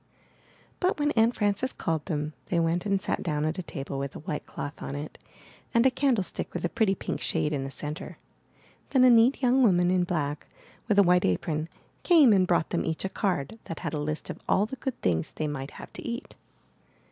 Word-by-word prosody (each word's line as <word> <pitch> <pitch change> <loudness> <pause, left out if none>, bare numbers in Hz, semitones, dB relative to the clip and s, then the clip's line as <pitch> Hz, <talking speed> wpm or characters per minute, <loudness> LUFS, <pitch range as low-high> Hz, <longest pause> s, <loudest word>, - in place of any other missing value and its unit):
But 370 +1 +1
when 295 0 +2
Aunt 225 0 +3
Frances 205 +5 0
called 160 -2 -2
them, 150 -3 -2
they 170 - +1
went 170 +4 0
and 195 -1 +2
sat - - -2
down 150 -2 -1
at 155 +3 -2
a - - -1
table 135 -4 -5
with 140 0 -4
a - - -6
white 150 -1 -5
cloth 145 - -6
on 140 - -5
it, 145 +1 -7 0.6
and 235 +2 +5
a 265 - +6
candle 260 -6 +2
stick - - -6
with - - -2
a - - 0
pretty 195 -1 +2
pink - - -4
shade 150 - 0
in 140 -2 -1
the - - -4
centre. 150 +5 -6 0.7
Then 260 -2 +4
a 255 - +8
neat 240 +4 +5
young 255 +1 +4
woman 180 -6 +4
in 185 -1 +3
black, 150 -5 -2 0.4
with 210 -3 +2
a 200 - +8
white 180 0 +4
apron, 155 - -1 0.3
came 310 - +6
and 185 -2 +3
brought 170 -3 +1
them - - 0
each 160 +3 -3
a - - -1
card 190 -1 -2
that 165 - -6
had - - -3
a 150 - -1
list 150 +1 -3
of - - -9
all 200 - +4
the 240 - -6
good 260 +1 -4
things 85 -3 +1
they 155 - -3
might 140 -2 -4
have - - -10
to - - -7
eat. 235 0 -5
180 Hz, 225 wpm, -27 LUFS, 150-225 Hz, 0.7 s, a